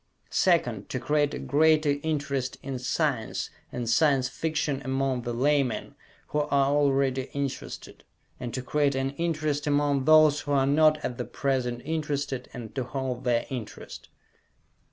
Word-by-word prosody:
Second, 125 Hz, -, +1 dB
to 130 Hz, -, -2 dB
create 145 Hz, +3 st, +1 dB
a -, -, -4 dB
greater 150 Hz, +1 st, +3 dB
interest 140 Hz, -4 st, -2 dB
in 135 Hz, -2 st, -4 dB
science 125 Hz, -3 st, -1 dB, 0.2 s
and 120 Hz, -1 st, -4 dB
Science 135 Hz, +1 st, +3 dB
Fiction 150 Hz, -1 st, -2 dB
among 130 Hz, -1 st, 0 dB
the 120 Hz, -, -4 dB
laymen 135 Hz, 0 st, 0 dB, 0.4 s
who 150 Hz, -, 0 dB
are 150 Hz, -, -1 dB, 0.2 s
already 135 Hz, -2 st, +1 dB
interested, 140 Hz, -2 st, -5 dB, 0.4 s
and 120 Hz, -, -5 dB
to 130 Hz, -, -4 dB
create 145 Hz, 0 st, +1 dB
an 135 Hz, 0 st, -1 dB
interest 155 Hz, -3 st, -1 dB
among 145 Hz, -2 st, +2 dB
those 155 Hz, -1 st, +6 dB
who 145 Hz, 0 st, -3 dB
are 135 Hz, -1 st, +3 dB
not 155 Hz, +2 st, +4 dB
at 125 Hz, -, -4 dB
the -, -, -2 dB
present 125 Hz, -3 st, -2 dB
interested, 145 Hz, -4 st, -2 dB
and 115 Hz, -3 st, -8 dB
to 130 Hz, -, -2 dB
hold 130 Hz, -1 st, -4 dB
their 120 Hz, -1 st, +2 dB
interest. 115 Hz, -5 st, -7 dB
140 Hz, 150 wpm, -27 LUFS, 130-150 Hz, 0.4 s, those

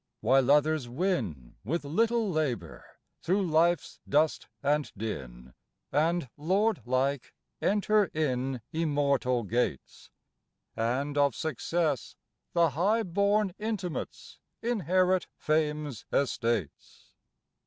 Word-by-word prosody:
While 130 Hz, +3 st, +3 dB
others 150 Hz, -2 st, +3 dB
win 120 Hz, -, -2 dB
With 155 Hz, -, -2 dB
little 225 Hz, +9 st, +1 dB
labor 140 Hz, -, -2 dB, 0.4 s
through 190 Hz, +3 st, +1 dB
life's 170 Hz, +2 st, +2 dB
dust 150 Hz, +2 st, +2 dB, 0.2 s
and 145 Hz, +1 st, +1 dB
din, 65 Hz, -, -6 dB, 0.4 s
And 165 Hz, 0 st, +1 dB
lord 195 Hz, +7 st, +1 dB
like 130 Hz, +1 st, 0 dB, 0.3 s
enter 210 Hz, +1 st, +3 dB
in 135 Hz, -6 st, -2 dB
Immortal 140 Hz, -6 st, +1 dB
gates; 105 Hz, -, -2 dB, 0.7 s
And, 135 Hz, +6 st, -1 dB
of 140 Hz, -4 st, +3 dB
Success 160 Hz, -2 st, -1 dB, 0.4 s
the 170 Hz, -3 st, +3 dB
high 205 Hz, -, +2 dB
born 200 Hz, +1 st, +1 dB
intimates, 210 Hz, -6 st, -4 dB, 0.2 s
Inherit 185 Hz, -5 st, +2 dB
Fame's 150 Hz, -5 st, -1 dB
estates.... 115 Hz, -, -2 dB
150 Hz, 95 wpm, -29 LUFS, 130-180 Hz, 0.7 s, While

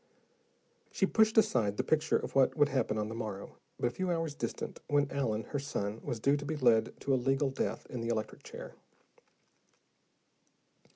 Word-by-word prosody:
She 195 Hz, -, +2 dB
pushed 220 Hz, +3 st, +3 dB
aside 120 Hz, -, +3 dB
the -, -, +1 dB
picture 155 Hz, 0 st, +2 dB
of -, -, -5 dB
what 135 Hz, +3 st, +3 dB
would 145 Hz, -1 st, +4 dB
happen 130 Hz, -6 st, 0 dB
on 105 Hz, 0 st, -1 dB
the 110 Hz, -, -5 dB
morrow, 110 Hz, -4 st, -6 dB, 0.2 s
but -, -, 0 dB
a 120 Hz, -, +2 dB
few 185 Hz, +7 st, -2 dB
hours 165 Hz, -3 st, -1 dB
distant, 145 Hz, -, -5 dB
when 145 Hz, -1 st, +2 dB
Allen, 115 Hz, -6 st, -1 dB
her 145 Hz, -, -2 dB
son, 110 Hz, -6 st, -3 dB
was 120 Hz, -, -3 dB
due 140 Hz, +5 st, +3 dB
to 145 Hz, -, -6 dB
be 155 Hz, +2 st, -2 dB
led 115 Hz, -5 st, +3 dB
to 140 Hz, -, +1 dB
a -, -, +4 dB
legal 135 Hz, +2 st, +1 dB
death 135 Hz, -, -2 dB
in 125 Hz, -, -6 dB
the 115 Hz, -, -3 dB
electric 110 Hz, -2 st, -2 dB
chair. -, -, -9 dB
135 Hz, 185 wpm, -32 LUFS, 115-150 Hz, 0.2 s, would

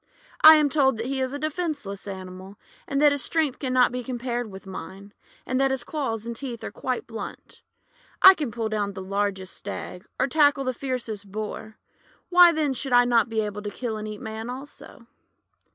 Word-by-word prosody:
I 315 Hz, 0 st, +12 dB
am 305 Hz, -1 st, +4 dB
told 270 Hz, -4 st, +2 dB
that 225 Hz, -, -4 dB
he 265 Hz, +1 st, -2 dB
is 260 Hz, 0 st, -1 dB
a 285 Hz, -, -4 dB
defenceless 295 Hz, -, -4 dB
animal, 190 Hz, 0 st, -8 dB, 0.3 s
and 275 Hz, -, -1 dB
that 295 Hz, 0 st, +6 dB
his 285 Hz, -3 st, -1 dB
strength 310 Hz, -5 st, 0 dB
can 260 Hz, -3 st, -3 dB
not 255 Hz, -1 st, +4 dB
be 250 Hz, 0 st, -4 dB
compared 245 Hz, -2 st, -3 dB
with 195 Hz, 0 st, -11 dB
mine, 195 Hz, +1 st, -9 dB, 0.3 s
and 255 Hz, +1 st, 0 dB
that 270 Hz, -, +3 dB
his 265 Hz, -2 st, -2 dB
claws 235 Hz, -8 st, -3 dB
and 235 Hz, 0 st, -5 dB
teeth 240 Hz, -2 st, -6 dB
are -, -, -5 dB
quite 255 Hz, -1 st, -3 dB
blunt. 225 Hz, -3 st, -9 dB, 0.6 s
I 380 Hz, -, +10 dB
can 300 Hz, -8 st, -3 dB
pull 225 Hz, -1 st, -2 dB
down 205 Hz, -2 st, -2 dB
the 190 Hz, -1 st, -7 dB
largest 195 Hz, -1 st, -2 dB
Stag, 180 Hz, -, -7 dB
or -, -, +3 dB
tackle 285 Hz, -1 st, +3 dB
the 255 Hz, -1 st, -1 dB
fiercest 235 Hz, -6 st, -5 dB
Boar, 215 Hz, +1 st, -6 dB, 0.5 s
why 355 Hz, -1 st, +8 dB
then 305 Hz, -4 st, 0 dB
should 260 Hz, 0 st, -3 dB
I 245 Hz, 0 st, +6 dB
not 235 Hz, -2 st, +3 dB
be 220 Hz, -1 st, 0 dB
able 210 Hz, -1 st, -4 dB
to 205 Hz, -, -4 dB
kill 230 Hz, +1 st, -4 dB
and 215 Hz, 0 st, -5 dB
eat 210 Hz, -1 st, -7 dB
Man 220 Hz, +1 st, -6 dB
also?' 260 Hz, -2 st, -10 dB
240 Hz, 200 wpm, -25 LUFS, 210-275 Hz, 0.6 s, I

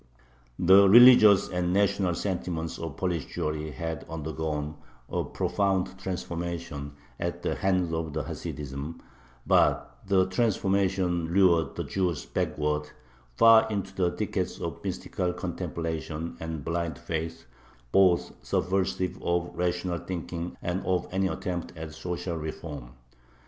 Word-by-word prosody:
The 95 Hz, +2 st, +7 dB
religious 115 Hz, -3 st, +8 dB
and 90 Hz, 0 st, -1 dB
national 100 Hz, -3 st, +2 dB
sentiments 85 Hz, -3 st, -3 dB
of 80 Hz, -3 st, -6 dB
Polish 85 Hz, -6 st, -1 dB
Jewry 75 Hz, 0 st, -3 dB
had 80 Hz, +2 st, -4 dB
undergone 75 Hz, -1 st, -3 dB, 0.3 s
a -, -, -1 dB
profound 95 Hz, -1 st, -1 dB
transformation 85 Hz, -5 st, -4 dB, 0.3 s
at -, -, -3 dB
the -, -, 0 dB
hands 90 Hz, -3 st, 0 dB
of 80 Hz, -2 st, -3 dB
Hasidism, 70 Hz, +2 st, -5 dB, 0.5 s
but -, -, +2 dB
the 95 Hz, -1 st, +4 dB
transformation 95 Hz, -4 st, +1 dB
lured 85 Hz, -3 st, +3 dB
the -, -, -2 dB
Jews 90 Hz, -4 st, -1 dB
backward, 75 Hz, 0 st, -1 dB, 0.5 s
far 115 Hz, -, +7 dB
into 100 Hz, -3 st, -3 dB
the 90 Hz, -2 st, +1 dB
thickets -, -, -3 dB
of -, -, -5 dB
mystical 90 Hz, -1 st, -2 dB
contemplation 80 Hz, -1 st, -4 dB
and 80 Hz, -3 st, -5 dB
blind 85 Hz, -2 st, -2 dB
faith, 80 Hz, 0 st, -4 dB, 0.5 s
both 95 Hz, -3 st, +4 dB
subversive 95 Hz, -1 st, -1 dB
of 85 Hz, 0 st, 0 dB
rational 90 Hz, 0 st, -1 dB
thinking 85 Hz, -1 st, -5 dB
and 90 Hz, +2 st, -2 dB
of 90 Hz, -2 st, 0 dB
any 95 Hz, +1 st, +1 dB
attempt 90 Hz, -3 st, -4 dB
at 80 Hz, -1 st, -7 dB
social 85 Hz, +1 st, -4 dB
reform. 75 Hz, -5 st, -7 dB
85 Hz, 120 wpm, -28 LUFS, 80-95 Hz, 0.5 s, religious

